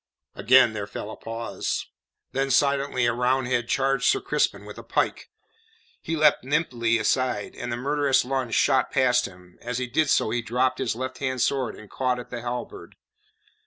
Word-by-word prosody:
Again 125 -1 +5
there 105 -1 -4
fell 105 - -6
a - - -7
pause. 115 0 -4 0.5
Then 135 +1 -1
silently 140 -2 +2
a 120 - +2
Roundhead 125 0 0
charged 135 -1 +1
Sir - - +4
Crispin - - -1
with - - -9
a - - -10
pike. - - -1 0.7
He 165 - -3
leapt 150 -4 +4
nimbly 125 -5 +1
aside, 120 0 0
and 120 - -5
the 120 - -2
murderous 140 +1 +1
lunge 130 -3 -2
shot 135 -2 +3
past 125 -2 +2
him; 90 -1 -17
as 120 0 -4
he 125 - -1
did 145 +4 0
so 110 - +2
he 120 +1 0
dropped 125 +3 0
his - - -1
left 130 +1 -5
hand 130 -2 -2
sword 135 -2 0
and 110 - -13
caught 125 +3 -1
at 125 - -9
the 120 -1 -5
halberd. 125 - -6
125 Hz, 180 wpm, -25 LUFS, 120-135 Hz, 0.7 s, Again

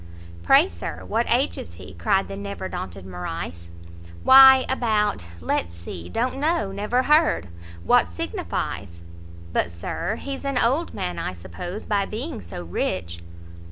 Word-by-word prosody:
"Pray; 85 - +6
Sir, 85 -2 -7
what - - 0
age - - +2
is 85 - -9
he?" 95 - -11
cried 90 - +1
the 195 - -6
never 200 -1 -5
daunted 95 - -6
Morrice. 85 -2 -6 0.5
"Why 265 0 +9
about 215 - +1 0.2
let's 85 +1 -1
see 85 0 -8
don't 250 - -1
know, 285 - 0
never 210 +6 0
heard, 300 - +3 0.3
what 90 0 +4
signifies?" 85 0 -4 0.5
"But, 85 - +1
Sir, 85 - -3
he's 275 +3 -6
an 275 -2 -1
old 270 +9 +1
man, 90 -1 -3
I 90 - -3
suppose, 95 - -7
by 200 -2 0
being 245 +9 -5
so 85 0 -7
rich?" 85 0 -3
175 Hz, 145 wpm, -24 LUFS, -, 0.5 s, Why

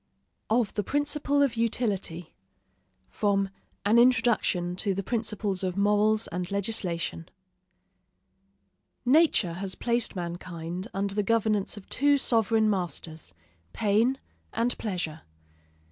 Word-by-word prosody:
OF 225 -1 +1
THE 210 - 0
PRINCIPLE 285 +3 +1
OF 260 -4 +1
UTILITY 200 -7 -1 0.8
From 200 -2 +1 0.4
'An 220 +3 +5
Introduction 230 -8 +3
to 195 0 0
the 195 - -2
Principles 210 -3 -1
of 185 0 -2
Morals 210 +2 +3
and 180 +1 -4
Legislation' 180 - -2 1.8
Nature 260 - +4
has 190 +2 -3
placed 235 -2 0
mankind 175 +1 -5
under 195 0 -1
the 210 - +1
governance 215 -1 0
of 195 - -11
two 285 +2 +3
sovereign 225 -3 +2
masters, 165 - -3 0.4
pain 225 +5 +2 0.4
and 235 +2 0
pleasure. 180 -7 -3
205 Hz, 110 wpm, -27 LUFS, 180-230 Hz, 1.8 s, An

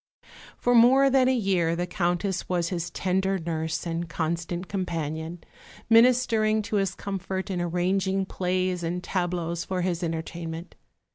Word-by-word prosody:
For 245 - +1
more 260 +4 +6
than 260 -1 +4
a 260 - +3
year 185 -7 +1
the 175 +1 -1
Countess 180 +1 -1
was 175 -2 0
his 175 -2 -3
tender 190 +2 0
nurse 160 -1 -3
and 170 0 -3
constant 170 +2 -3
companion, 165 -3 -4 0.5
ministering 230 -2 +4
to 210 0 -1
his 195 -2 0
comfort 190 0 -4
and 180 -2 -1
arranging 190 +3 0
plays 185 -1 -1
and 175 +2 -3
tableaux 175 -2 -2
for 180 +1 -2
his 175 -2 -1
entertainment. 165 0 -5
180 Hz, 140 wpm, -26 LUFS, 170-195 Hz, 0.5 s, more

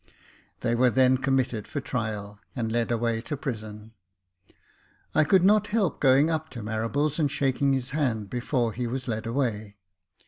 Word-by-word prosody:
They 120 -1 0
were 125 +1 +4
then 130 +1 +4
committed 130 -5 0
for - - -3
trial, 105 -6 -4 0.2
and 115 -3 -2
led 115 0 0
away 115 -1 0
to 145 +4 -5
prison. 110 -4 -6 1.2
I - - +5
could 175 +4 +4
not 210 +2 +4
help 210 -4 0
going 135 +2 +5
up 160 0 -2
to 115 - -6
Marables 115 +8 -1
and 150 -3 +2
shaking 140 0 +1
his 130 -1 -2
hand, 125 -8 -1
before 120 0 -1
he 120 +1 -3
was 125 +2 -4
led 110 -1 -3
away. 110 -5 -2
125 Hz, 165 wpm, -26 LUFS, 110-140 Hz, 1.2 s, I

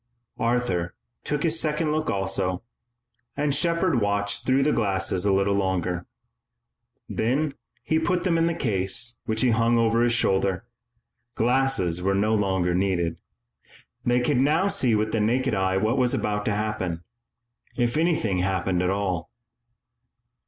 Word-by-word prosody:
Arthur 115 -8 0 0.3
took 150 0 -2
his 165 -1 +1
second 155 0 0
look 155 0 -1
also, 95 -2 -1 0.7
and 145 -1 +1
Shepard 170 -3 +1
watched 100 0 -1
through 135 +1 +3
the 150 - +2
glasses 95 -4 0
a 100 - +3
little 100 +1 +2
longer. 90 -3 -1 1.0
Then 135 +6 -1 0.3
he 160 - +1
put 175 +2 0
them 180 -3 +1
in 165 0 +2
the 170 - -1
case 115 +2 -1
which 110 0 -1
he 125 -2 +3
hung 115 +1 +2
over 115 0 +2
his 120 0 +3
shoulder. 95 -3 +1 0.7
Glasses 120 -8 +1
were 95 +2 +1
no 105 +3 +1
longer 95 -4 +1
needed. 90 -3 0 0.9
They 120 0 +2
could 130 +2 +1
now 155 +9 +2
see 125 - +2
with 110 0 0
the 115 - 0
naked 125 +5 +1
eye 95 0 +1
what 110 +7 +1
was 125 -1 +2
about 105 -1 -2
to 105 - 0
happen 95 -6 -3 0.7
if 120 -1 0
anything 155 - +1
happened 95 -1 0
at 90 - +1
all. 95 -4 -2
110 Hz, 150 wpm, -25 LUFS, 95-135 Hz, 1.0 s, through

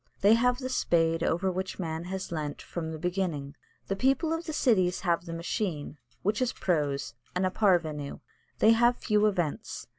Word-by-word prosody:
They 205 +3 +6
have 245 +2 +3
the 255 0 -4
spade 165 -8 +2
over 185 +3 +1
which 185 +1 -4
man 165 -2 -3
has 190 0 -5
leant 150 -3 -3
from 160 -2 -5
the 160 - -5
beginning. 170 -5 -2 0.3
The 195 - -2
people 270 - +2
of 325 +1 -3
the 315 - -3
cities 190 - +2
have 170 -2 0
the - - -5
machine, 165 -3 -3 0.3
which 210 +5 0
is 255 - +1
prose 145 -7 -1 0.2
and 185 +1 +1
a 185 - +1
parvenu. 165 -8 +1 0.4
They 220 - +6
have 240 +2 +4
few 210 -1 +2
events. 175 -8 -2
180 Hz, 180 wpm, -29 LUFS, 165-215 Hz, 0.4 s, They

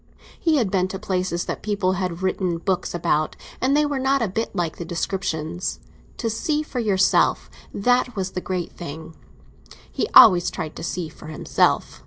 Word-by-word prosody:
He 325 -2 +2
had 230 -9 +1
been 185 -1 +2
to 190 - -5
places 185 -3 -2
that - - -4
people 200 -3 0
had 185 -1 -3
written 185 -2 0
books 180 +1 -2
about, 155 -2 0 0.3
and 270 +3 +3
they 300 - +3
were 290 -2 -1
not 270 -1 +2
a - - +1
bit 220 +5 -3
like 170 -3 -2
the - - -5
descriptions. 170 -1 -3 0.4
To 230 - -2
see 295 +8 -1
for 270 -4 -5
yourself—that 220 +3 +1
was 190 -2 -2
the 185 - -4
great 180 -2 -3
thing; 160 0 -8 0.8
he - - -1
always 185 -9 +8
tried 160 -3 -6
to - - -7
see 170 0 -3
for 155 - -13
himself. 155 - 0
185 Hz, 175 wpm, -23 LUFS, 175-225 Hz, 0.8 s, always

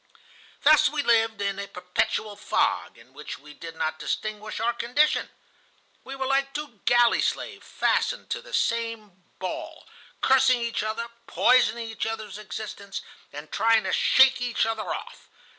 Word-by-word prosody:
"Thus - - +6
we - - -2
lived 225 -3 +2
in 200 0 -2
a 200 - -4
perpetual 195 +3 -2
fog, 205 - 0
in 120 +3 -19
which 150 +2 -8
we 150 +1 -14
did 165 +1 -9
not 155 0 -2
distinguish 215 0 -4
our 235 +1 +1
condition. 250 +6 +1 0.7
We 270 - -7
were 265 0 -3
like 275 +1 0
two 290 -8 -6
galley 240 -1 +4
slaves - - -3
fastened - - 0
to - - -2
the - - -14
same 230 - -2 0.2
ball, 320 - -6 0.3
cursing 260 -1 +4
each 235 0 -2
other, 220 +2 -3 0.2
poisoning 235 -2 +3
each 225 0 -3
other's 220 -2 -5
existence, 205 -1 -7 0.3
and 150 +1 -9
trying 225 -1 +3
to - - -2
shake 265 -1 +5
each 245 -2 +1
other 225 -1 -3
off. - - -7
225 Hz, 155 wpm, -26 LUFS, 200-245 Hz, 0.7 s, Thus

